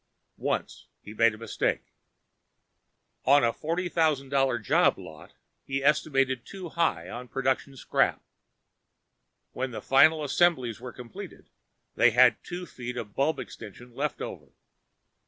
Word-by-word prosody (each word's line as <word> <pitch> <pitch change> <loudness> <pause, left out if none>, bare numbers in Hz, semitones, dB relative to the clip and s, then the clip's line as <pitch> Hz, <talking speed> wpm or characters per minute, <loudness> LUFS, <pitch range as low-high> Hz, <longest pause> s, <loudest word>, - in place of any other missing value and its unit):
Once, - - -3 0.2
he 105 - -10
made 115 0 +3
a - - -13
mistake. 115 - -2 1.3
On 140 +1 +5
a 115 -1 +2
forty 170 +4 -2
thousand 155 -6 +1
dollar 135 -3 +2
job 110 - +3
lot 80 -1 -12 0.3
he 135 0 -3
estimated 135 -4 +2
too 185 +1 -8
high 105 - 0
on 125 +6 -7
production 135 +1 -1
scrap. - - +1 1.3
When 130 +1 -3
the 120 - -6
final 155 +3 +4
assemblies 130 -7 +1
were 125 -1 -7
completed, 120 -2 -11 0.4
they 120 - +5
had 120 0 +4
two 180 +1 -6
feet 125 -5 -7
of 105 -4 -6
bulb 155 +4 +1
extension 115 +3 -10
left 145 +4 -3
over. - - -9
130 Hz, 135 wpm, -27 LUFS, 120-150 Hz, 1.3 s, On